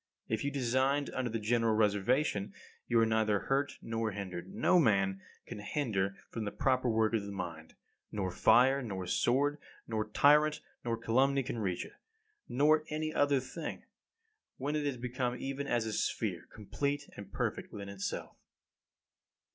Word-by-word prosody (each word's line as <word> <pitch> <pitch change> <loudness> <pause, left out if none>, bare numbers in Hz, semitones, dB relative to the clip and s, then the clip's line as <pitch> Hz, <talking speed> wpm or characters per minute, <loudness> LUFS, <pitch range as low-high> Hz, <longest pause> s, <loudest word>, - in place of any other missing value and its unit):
If 110 -1 -1
you 140 - +1
designed 135 +1 +1
under 130 -2 -2
the 115 - -2
general 115 0 +2
reservation, 105 +1 +1 0.3
you 120 - +3
are 115 - +5
neither 110 -2 +2
hurt 140 +1 0
nor 115 0 -1
hindered. 95 - -6
No 185 -3 +4
man 95 - +2 0.2
can 115 - -7
hinder 105 -5 -1 0.2
the 110 -3 -2
proper 130 -2 +1
work 110 -1 +2
of 110 - +2
the 100 - -6
mind. 85 -4 -6 0.4
Nor 95 -3 -2
fire, 130 +8 +5
nor 95 -7 -4
sword, 145 +9 +1 0.3
nor 110 -1 -2
tyrant, 150 +6 +5 0.2
nor 115 -1 -1
calumny 135 +4 +2
can 120 - -4
reach 90 -4 -1
it, - - -13 0.6
nor 150 +4 +4
any 155 +1 -2
other 145 -1 +3
thing, - - -6 0.7
when 145 +3 -2
it 150 -1 0
is 135 -3 -2
become 125 0 -2
even 135 +2 -4
as 120 -3 +1
a 110 - -3
sphere, 95 -5 -2
complete 140 +7 -3
and 100 - -10
perfect - - -2
within 100 -1 -7
itself. 100 -1 -5
115 Hz, 155 wpm, -32 LUFS, 105-140 Hz, 0.7 s, are